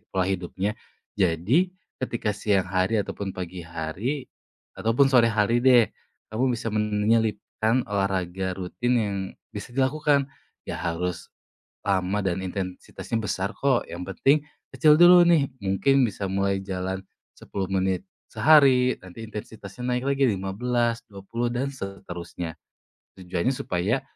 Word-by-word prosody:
pola 95 -1 0
hidupnya. 95 +2 -2 0.4
Jadi 105 - +2 0.3
ketika 120 -4 -1
siang 100 -2 +1
hari 95 +3 +1
ataupun 100 -1 -4
pagi 90 0 -5
hari 85 - -3 0.5
ataupun 120 +5 +3
sore 120 -2 +6
hari 110 +3 +2
deh 125 -4 +6 0.4
kamu 125 +3 +1
bisa 115 - -4
menyelipkan 110 +2 +1
olahraga 95 -2 -1
rutin 110 +7 -2
yang 105 -3 0 0.4
bisa 105 +4 -7
dilakukan. 140 +1 +2 0.4
Nggak - - -4
harus 85 0 -3 0.6
lama 95 +1 +1
dan 95 0 0
intensitasnya 95 +4 -5
besar 100 0 -2
kok, 135 -3 +2
yang 85 +1 -6
penting 140 +10 +2 0.3
kecil 155 -2 +5
dulu 175 0 +9
nih 160 -5 +4 0.2
mungkin 135 +8 +3
bisa 100 0 -4
mulai 100 0 +1
jalan 95 0 -3 0.4
10 95 -2 -4
menit 95 -1 +1 0.3
sehari, 130 0 +5
nanti 95 +5 -10
intensitasnya 110 +1 -8
naik 125 - -3
lagi 140 0 +2
15, 115 +4 0
20 100 +5 -4
dan 135 +3 -1
seterusnya. 90 - -7 0.6
Tujuannya 90 +5 -1
supaya, 100 +8 -1
105 Hz, 125 wpm, -25 LUFS, 95-125 Hz, 0.6 s, dulu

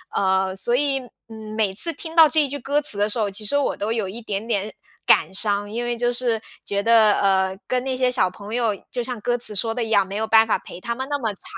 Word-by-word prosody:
呃， 190 -1 +1
所 215 +5 -1
以， 275 0 +1 0.3
嗯， 220 -1 -9
每 205 -3 0
次 335 - -1
听 325 +1 -9
到 320 -2 +7
这 300 -1 +3
句 285 +2 -3
歌 285 +4 0
词 280 -9 +2
的 205 +1 +1
时 225 - -1
候， 210 - 0
其 200 +2 -5
实 285 +7 +3
我 285 - 0
都 210 +2 -3
有 220 -4 -1
一 225 +5 -7
点 210 0 -4
点 210 -2 -2 0.4
感 - - +4
伤， 205 0 +1
因 240 +2 -3
为 240 0 -2
就 240 +1 0
是 240 -2 +1 0.2
觉 200 0 -1
得， 225 -1 +5
呃， 190 -1 +1
跟 250 0 -1
那 265 -1 -2
些 255 -1 +1
小 245 -7 +3
朋 200 +4 -8
友， 230 -4 0
就 245 - -3
像 240 -3 -5
歌 245 +2 0
词 220 -3 +5
说 225 +3 +1
的 235 +1 -2
一 225 - -5
样， 200 -3 +4
没 195 - -7
有 220 +1 -1
办 220 0 +4
法 - - +1
陪 180 - -11
他 235 0 -4
们 265 +1 -5
那 290 0 -1
么 225 -4 -2
长， - - -19
225 Hz, 290 characters per minute, -22 LUFS, 205-250 Hz, 0.4 s, 到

